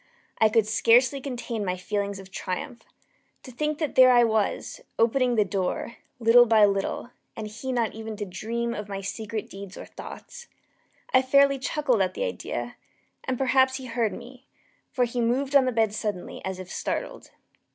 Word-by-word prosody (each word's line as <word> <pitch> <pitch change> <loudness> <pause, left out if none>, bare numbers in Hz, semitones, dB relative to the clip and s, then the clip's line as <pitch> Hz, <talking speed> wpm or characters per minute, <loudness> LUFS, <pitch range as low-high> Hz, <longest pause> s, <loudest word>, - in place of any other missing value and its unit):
I 220 - +5
could 215 0 +3
scarcely 240 +5 +3
contain 245 -4 -4
my 185 -2 -2
feelings 200 +1 -3
of 195 0 -12
triumph. 210 +8 -5 0.6
To 255 - -10
think 300 +4 -2
that 305 -3 -2
there 255 0 +7
I 240 -1 +6
was, 220 - -1 0.2
opening 245 +2 +2
the 210 -2 +3
door, 195 +4 -3 0.2
little 240 +1 +6
by 220 -2 +6
little, 200 +4 -2 0.2
and 220 - -5
he 225 +5 -5
not 235 -3 0
even 220 -1 -7
to 205 - -3
dream 230 +5 -3
of 210 -1 -6
my 195 -1 -4
secret 215 +2 -5
deeds 195 -1 -10
or - - -8
thoughts. 480 - -10 0.7
I - - +6
fairly 275 +1 +4
chuckled 265 -5 0
at 185 - 0
the 485 - -2
idea; - - -4 0.5
and 260 -1 -1
perhaps 260 0 +3
he 265 - -6
heard 230 -3 -1
me; 250 +1 -11 0.4
for 250 -3 +2
he 240 0 -3
moved 265 +4 0
on 275 -2 +7
the 255 - +1
bed 225 -3 +1
suddenly, 210 -4 -4
as 190 -1 -4
if 185 0 -9
startled. - - -4
230 Hz, 180 wpm, -26 LUFS, 210-255 Hz, 0.7 s, there